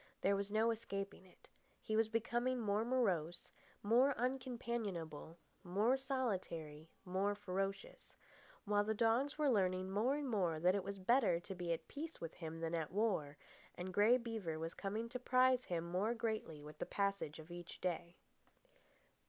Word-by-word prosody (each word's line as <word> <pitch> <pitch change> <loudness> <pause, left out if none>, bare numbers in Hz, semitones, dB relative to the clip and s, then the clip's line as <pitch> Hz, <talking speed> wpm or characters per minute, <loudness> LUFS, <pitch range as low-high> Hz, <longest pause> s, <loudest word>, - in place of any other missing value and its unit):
There 200 +1 +3
was 200 0 -2
no 220 +2 +3
escaping 195 -3 -5
it. 180 - -21 0.3
He 215 - -2
was 220 0 +3
becoming 240 +3 0
more 210 -1 +1
morose, 190 -10 0 0.3
more 250 +6 +5
uncompanionable, 235 - -3 0.3
more 205 +7 +3
solitary, 185 - -3 0.2
more 195 +3 0
ferocious; 195 - -4 0.5
while 205 0 +3
the 220 +1 0
dogs 235 +7 +2
were 305 -1 +2
learning 185 -5 +2
more 225 +8 +2
and 290 -1 -2
more 180 -9 +1
that 180 +3 +4
it 200 -1 0
was 200 0 -4
better 195 -2 +3
to 190 - -6
be 175 -2 -3
at 165 - -2
peace 320 +3 -6
with 165 -1 -5
him 165 -1 -6
than 165 0 -2
at 160 -3 -1
war, 185 -8 0 0.4
and 180 +1 -5
Grey 215 +6 +6
Beaver 220 -9 -3
was 165 +1 -4
coming 215 +3 -3
to 250 +2 -5
prize 255 0 +4
him 170 -2 -1
more 205 +6 +1
greatly 220 -10 -3
with 150 +1 -11
the - - -3
passage 200 -6 -1
of 160 +1 -11
each 175 -1 -8
day. 170 -1 -2
200 Hz, 165 wpm, -39 LUFS, 175-235 Hz, 0.5 s, Grey